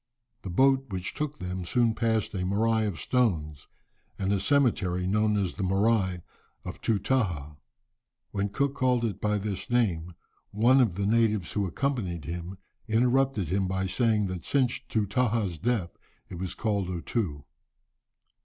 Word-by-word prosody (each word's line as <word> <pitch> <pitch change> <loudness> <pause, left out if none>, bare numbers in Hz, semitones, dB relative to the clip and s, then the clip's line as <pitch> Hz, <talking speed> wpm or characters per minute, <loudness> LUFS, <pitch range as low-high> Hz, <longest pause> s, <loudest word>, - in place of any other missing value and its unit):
The 95 - -6
boat 135 +7 +3
which 95 -2 -4
took 150 -1 -3
them 90 0 -4
soon 115 +5 +2
passed 110 -3 0
a - - -3
"moraï" 110 +4 +1
of 90 -7 -4
stones, 75 - 0 0.5
and 95 +1 0
a 100 - +1
cemetery 100 -8 +2
known 105 +2 +2
as 95 -3 -1
the 105 - -6
"morai 95 -1 +1 0.4
of - - -7
Tootahah." 95 - 0 0.7
When 100 0 -1
Cook 140 +5 0
called 125 -3 +1
it 100 -4 -3
by 105 0 +1
this 100 -2 -4
name, 90 -9 0 0.3
one 120 +6 +4
of 110 -9 +1
the 100 +1 -1
natives 110 -4 +2
who 100 -2 0
accompanied 95 - -2
him 85 +4 -5 0.3
interrupted 120 - +2
him 95 +1 +1
by 95 0 -1
saying 110 +1 +1
that 90 -3 -4
since 130 -4 +1
Tootahah's 105 -4 0
death 110 -5 0 0.4
it 85 - -7
was 95 -1 -4
called 100 -5 -1
O 90 -2 -3
Too. 80 - -3
105 Hz, 155 wpm, -28 LUFS, 90-115 Hz, 0.7 s, one